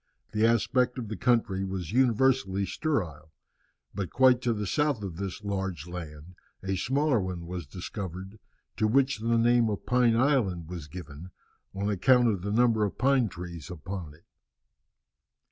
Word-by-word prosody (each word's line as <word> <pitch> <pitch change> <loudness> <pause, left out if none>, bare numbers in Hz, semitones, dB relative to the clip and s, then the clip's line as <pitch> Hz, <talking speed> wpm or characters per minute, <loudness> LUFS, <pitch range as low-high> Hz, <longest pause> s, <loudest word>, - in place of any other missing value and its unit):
The 110 +1 +3
aspect 125 +3 +2
of 115 -4 -5
the 110 - -3
country 110 -4 +1
was 95 -4 -4
universally 120 -5 +2
sterile. 90 - -3 0.6
But 95 -2 -3
quite 130 -1 +4
to 125 - +1
the 105 -2 -2
south 145 0 0
of 90 -5 -5
this 100 +1 -5
large 95 -6 -3
land 85 -1 -8 0.3
a 95 0 -1
smaller 135 +4 +1
one 90 -2 -5
was 85 -3 -6
discovered, 95 +4 -7 0.4
to 110 - +2
which 135 +2 +2
the 115 +1 +1
name 120 0 +4
of 105 - -4
Pine 125 -2 +3
Island 115 - +1
was 85 -4 -7
given, 80 +1 -9 0.5
on 100 +1 -2
account 120 +5 +4
of 100 -5 -1
the 100 +2 -3
number 115 -1 +3
of 100 - -2
pine 130 -4 +3
trees 85 -4 -8
upon 90 -2 -7
it. 80 - -25
100 Hz, 160 wpm, -28 LUFS, 90-120 Hz, 0.6 s, quite